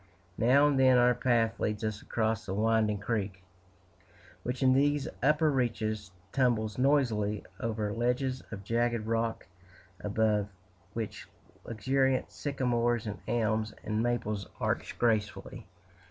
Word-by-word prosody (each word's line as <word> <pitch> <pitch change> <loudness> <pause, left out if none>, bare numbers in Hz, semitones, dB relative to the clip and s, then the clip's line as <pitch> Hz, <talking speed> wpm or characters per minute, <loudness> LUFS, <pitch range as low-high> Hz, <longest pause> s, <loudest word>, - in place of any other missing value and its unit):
Now 130 +5 +5
and 145 -2 +2
then 130 -1 +6
our 125 0 +5
path 115 -2 +1
leads 105 +1 -1
us 110 -1 -2
across 110 -1 -1
the 95 - -2
winding 110 0 +2
creek, 100 -3 -3 1.0
which 125 +2 -3
in 130 0 +5
these 145 +1 +2
upper 150 +3 +3
reaches 110 -5 -1 0.2
tumbles 115 -4 +1
noisily 115 -7 +1
over 110 -3 -2
ledges 125 +3 0
of 100 -3 -7
jagged 115 +1 0
rock, 115 0 -1 0.6
above 105 0 +1 0.4
which 115 -2 -5 0.4
luxuriant 130 +4 0
sycamores, 120 -5 0
and 105 -1 -5
elms, 110 -2 0
and 110 +1 -1
maples 110 -4 -1
arch - - -2
gracefully. 110 -3 -1
115 Hz, 125 wpm, -30 LUFS, 110-125 Hz, 1.0 s, then